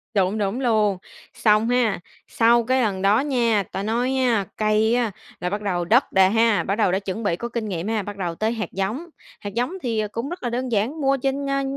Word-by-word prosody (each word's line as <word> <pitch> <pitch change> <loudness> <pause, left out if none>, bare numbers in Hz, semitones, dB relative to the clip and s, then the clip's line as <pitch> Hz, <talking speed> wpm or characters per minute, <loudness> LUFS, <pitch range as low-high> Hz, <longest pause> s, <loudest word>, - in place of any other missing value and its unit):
Đúng, 195 +2 +2
đúng 205 +4 -1
luôn, 215 -5 +2 0.4
xong 220 -1 +3
ha, 245 -6 +2 0.3
sau 235 +1 +3
cái 255 +3 +1
lần 200 -5 -1
đó 200 +3 +4
nha 240 -7 +1
ta 195 - -3
nói 245 +5 0
á 235 -6 +2
cây 215 +2 +2
á 235 -4 0 0.3
là 180 - -2
bắt 205 +2 -3
đầu 180 -4 -1
đất 240 +9 +3
đè 190 0 +5
ha, 225 0 +3
bắt 195 - -1
đầu 215 -4 +2
đã 190 - +1
chuẩn 200 +3 -5
bị 170 -4 +1
có 235 +6 -5
kinh 230 -2 -3
nghiệm 180 +1 -3
ha, 220 -1 0
bắt 205 +1 -7
đầu 175 -3 -3
tới 220 +4 0
hạt 225 -2 -4
giống. 205 - -3 0.3
Hạt 205 -1 -7
giống 245 - -1
thì, 230 -3 -1
ờ, 210 - -1
cũng 230 +5 -4
rất 350 -3 -7
là 240 - -1
đơn 250 +1 -3
giản, 230 +9 -1
mua 275 0 +2
trên, 275 +1 -2
a, 275 0 0
220 Hz, 240 wpm, -23 LUFS, 200-245 Hz, 0.4 s, đè